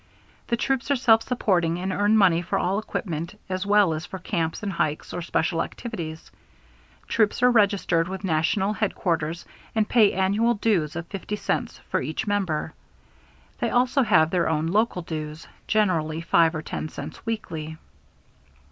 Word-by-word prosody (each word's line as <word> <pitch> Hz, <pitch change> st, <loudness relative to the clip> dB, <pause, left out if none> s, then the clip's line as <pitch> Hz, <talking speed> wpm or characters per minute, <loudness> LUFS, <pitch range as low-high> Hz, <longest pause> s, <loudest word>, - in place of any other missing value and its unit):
The 235 Hz, -, 0 dB
troops 265 Hz, +2 st, -1 dB
are 280 Hz, -, +4 dB
self 225 Hz, -3 st, +5 dB
supporting 180 Hz, -9 st, +1 dB
and 185 Hz, +1 st, -2 dB
earn 205 Hz, +2 st, +3 dB
money 180 Hz, -5 st, +4 dB
for 175 Hz, -, -2 dB
all 195 Hz, +3 st, 0 dB
equipment 175 Hz, -2 st, -4 dB
as 185 Hz, +1 st, -2 dB
well 205 Hz, -4 st, +4 dB
as 155 Hz, +1 st, -4 dB
for 190 Hz, -, -7 dB
camps 170 Hz, 0 st, -2 dB
and 200 Hz, -2 st, -2 dB
hikes 155 Hz, -2 st, -2 dB
or 175 Hz, -, -3 dB
special 165 Hz, 0 st, 0 dB
activities. 165 Hz, -10 st, -6 dB, 0.8 s
Troops 220 Hz, +1 st, +1 dB
are 250 Hz, -, +7 dB
registered 200 Hz, -6 st, +2 dB
with 190 Hz, +1 st, -6 dB
national 190 Hz, +4 st, +1 dB
headquarters 170 Hz, -6 st, -1 dB, 0.3 s
and 215 Hz, -1 st, +2 dB
pay 220 Hz, -4 st, +5 dB
annual 205 Hz, +5 st, +2 dB
dues 195 Hz, -8 st, 0 dB
of 170 Hz, 0 st, -4 dB
50 195 Hz, +3 st, -5 dB
cents -, -, -3 dB
for -, -, +1 dB
each 155 Hz, +9 st, -3 dB
member. 195 Hz, -7 st, -1 dB, 0.9 s
They -, -, 0 dB
also 250 Hz, +3 st, +2 dB
have 160 Hz, -9 st, +4 dB
their 180 Hz, -3 st, +1 dB
own 160 Hz, 0 st, 0 dB
local 190 Hz, 0 st, +1 dB
dues, 155 Hz, -1 st, -6 dB, 0.2 s
generally 165 Hz, -7 st, +1 dB
5 165 Hz, 0 st, +3 dB
or 155 Hz, -, -4 dB
10 155 Hz, -, -4 dB
cents -, -, -8 dB
weekly. 160 Hz, -9 st, -4 dB
185 Hz, 160 wpm, -25 LUFS, 165-215 Hz, 0.9 s, are